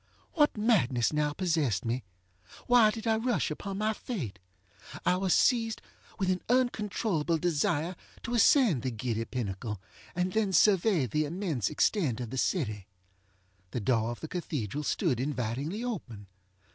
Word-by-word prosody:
What 295 -7 +3
madness 165 - +2
now 150 0 +1
possessed 155 - 0
me? 120 +2 -1 0.6
Why 245 -3 +6
did 220 +1 -5
I 220 -1 +2
rush 240 -6 0
upon 195 +5 -5
my 215 +1 +1
fate? 140 - -5 0.7
I 180 - +4
was 185 0 0
seized 225 -1 +3 0.4
with 190 -2 +1
an 185 - -1
uncontrollable 210 -9 +1
desire 165 +1 0 0.3
to 235 - -4
ascend 235 - +5
the 130 - -1
giddy 115 -1 -3
pinnacle, 105 -3 -4 0.4
and 180 +1 -1
then 215 -3 +1
survey 190 - +4
the 150 +6 0
immense 155 - -2
extent 150 - +1
of 120 -2 -5
the 130 - -2
city. 105 - -1 0.8
The 120 - -3
door 115 0 +1
of 120 - -6
the 160 - -5
cathedral 150 - -3
stood 145 - 0
invitingly 135 - -2
open. 130 - -5
165 Hz, 145 wpm, -29 LUFS, -, 0.8 s, Why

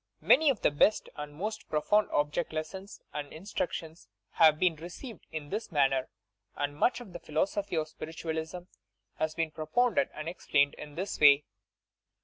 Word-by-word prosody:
Many 300 +3 +6
of 260 -7 0
the - - +3
best 145 +9 +3
and 150 0 -6
most 210 +8 -5
profound 210 +8 +2
object 150 +3 0
lessons 190 +6 -6
and 145 -1 -5
instructions 165 -2 -5 0.2
have 155 -2 +6
been 180 -1 +2
received 180 - -9
is 150 -2 -6
this 215 +1 -3
manner, 135 -4 +2 0.5
and 145 0 -2
much 245 +11 +2
of 205 -7 -11
the 175 - -6
philosophy 170 +5 -1
of 155 -1 -1
Spiritualism 160 +2 -5 0.6
has 155 0 -1
been 165 -2 -1
propounded 245 - +1
and 155 +1 -6
explained 145 -4 +2
in 150 -1 -10
this 190 +4 -3
way. 145 -1 +7
160 Hz, 155 wpm, -30 LUFS, 150-195 Hz, 0.6 s, way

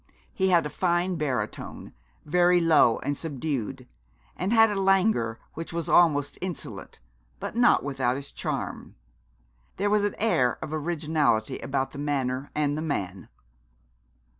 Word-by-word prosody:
He 190 0 +1
had 170 -4 +4
a 150 - -4
fine 175 0 0
baritone, 145 -6 -4 0.3
very 175 +3 +4
low 160 -8 +4
and 145 - -1
subdued, 140 -6 -4 0.5
and 185 +4 -2
had 225 -1 +6
a 200 -1 -1
languor 195 - +2
which 165 +1 -6
was 165 -1 -3
almost 145 -5 +3
insolent, 180 - -6 0.4
but - - -5
not 240 +1 +4
without 135 -2 -1
its 140 0 -7
charm. - - -5 0.8
There 205 +2 0
was 210 -1 +3
an 205 - -1
air 130 - +2
of 155 - -6
originality 155 -7 0
about 135 +2 -2
the 140 - -8
manner 135 -2 -2
and 145 -1 +1
the 155 - -3
man. 95 - -4
155 Hz, 140 wpm, -26 LUFS, 135-180 Hz, 0.8 s, had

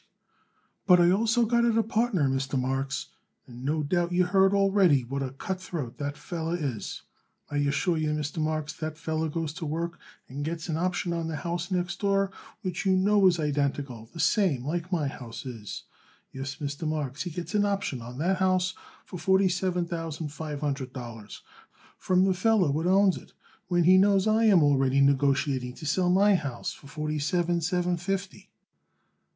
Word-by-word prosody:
"But 180 -2 +7
I 175 0 +5
also 230 +4 +3
got 235 +1 +2
it 230 -1 +2
a 225 - +4
partner, 220 - +1
Mr. 135 0 -1
Marks, 135 +1 -2 0.4
and 125 0 -11
no 150 +3 0
doubt 175 +3 0
you 180 +1 +3
heard 190 +1 +4
already 195 -8 +4
what 135 +3 -4
a 135 - -2
cutthroat 155 -3 -5
that 145 0 -3
feller 165 0 -3
is. 130 -9 -4 0.5
I 145 - -1
assure 145 +5 +1
you, 155 -1 0
Mr. 150 +1 -2
Marks, 155 -1 -1
that 155 -1 -5
feller 160 0 -2
goes 160 -1 -3
to 160 - -6
work 170 +3 -3 0.3
and 140 +3 -5
gets 165 +2 -4
an 160 - 0
option 175 +1 -1
on 165 -1 -2
the 160 - -3
house 170 +1 -3
next 180 0 -2
door 195 -1 +1 0.3
which 180 -2 -3
you 190 - +3
know 200 +1 +4
is 175 -2 +3
identical 140 -6 -2
the 165 - -10
same 150 - +2
like 170 +4 -3
my 160 -6 +1
house 125 -2 -8
is. 115 -5 -7 0.5
Yes, 135 +1 -5
Mr. 145 0 -4
Marks, 150 -3 -3
he 180 - -3
gets 170 +2 -6
an 205 -1 +3
option 195 -11 -1
on 120 +2 -9
that 180 +6 +1
house 185 -1 +2 0.3
for 180 - -8
forty 190 +1 +3
seven 180 -1 0
thousand 165 -2 -4
five 150 0 -6
hundred 140 -3 -3
dollars 115 -4 -9 0.6
from 185 0 +2
the 190 - +3
feller 185 -4 +2
what 160 +4 -1
owns 195 0 +4
it, - - -14 0.3
when 175 -1 +2
he 185 +3 +6
knows 195 -1 +4
I 220 +1 +3
am 195 -7 +6
already 135 -2 +3
negotiating 135 -2 +2
to - - -9
sell 180 +4 +1
my 200 +3 +5
house 140 -9 -2
for 140 - -15
forty 150 +1 -3
seven 175 +3 0
seven 180 +1 0
fifty." 195 +2 -4
165 Hz, 185 wpm, -27 LUFS, 140-185 Hz, 0.6 s, But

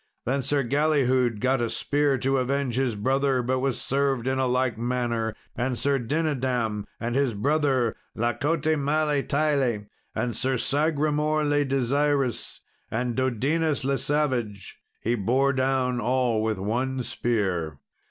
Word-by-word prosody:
Then 135 +3 0
Sir 140 +1 0
Galihud 130 -4 +2
got 130 +1 +1
a 115 - 0
spear 145 +4 +1
to 135 +1 +1
avenge 135 0 -1
his 130 -3 0
brother, 130 +3 +1
but 130 +2 0
was 135 -1 0
served 135 -3 0
in 130 0 0
like 130 -1 +1
manner. 115 -2 -1 0.2
And 125 0 -1
Sir 140 +2 +1
Dinadam, 125 -6 -1
and 120 +1 -2
his 135 -4 +1
brother 135 0 +1 0.2
La 120 +2 0
cote 150 +1 -1
male 150 -1 +1
taile, 140 -8 0 0.3
and 120 -3 -1
Sir 130 +2 0
Sagramour 150 +2 +1
le 145 0 +2
Desirous, 135 -1 0 0.3
and 120 +1 -2
Dodinas 140 +5 0
le 135 0 +1
Savage, 125 -9 -2 0.2
he 115 - 0
bore 125 +6 +2
down 130 -1 +1
all 125 -1 +1
with 110 -1 0
one 125 +6 -1
spear. 95 -12 -1
130 Hz, 140 wpm, -26 LUFS, 120-140 Hz, 0.3 s, Galihud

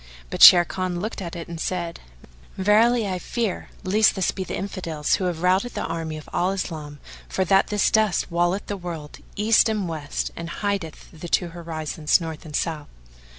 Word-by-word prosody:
But - - -4
Sharrkan 180 0 +7
looked 210 +2 -4
at 170 -2 -6
it 170 -1 -6
and 170 -1 -7
said, 170 -2 -3 0.6
"Verily, 215 +3 +3
I 185 -1 -2
fear 225 0 -3
lest 210 +3 +3
this 190 - +1
be 190 - -4
the - - -5
Infidels 165 -6 -2
who 190 - -2
have 175 -1 -3
routed 190 +6 +2
the - - -2
army 160 -1 -4
of 155 - -11
Al 180 - +1
Islam 155 -6 -5 0.3
for 190 - 0
that 195 +2 +4
this 210 -1 +1
dust 215 -5 +2
walleth 175 +3 0
the 205 - -4
world, 165 -5 -7 0.2
east 215 +2 +4
and 210 -4 -1
west, 155 -3 -4
and 170 0 -6
hideth 195 -5 -4
the 165 +1 -8
two 175 0 +1
horizons, 160 -2 -1
north 160 -2 -7
and 150 -2 -7
south." 155 -3 -2
175 Hz, 185 wpm, -23 LUFS, 165-195 Hz, 0.6 s, Sharrkan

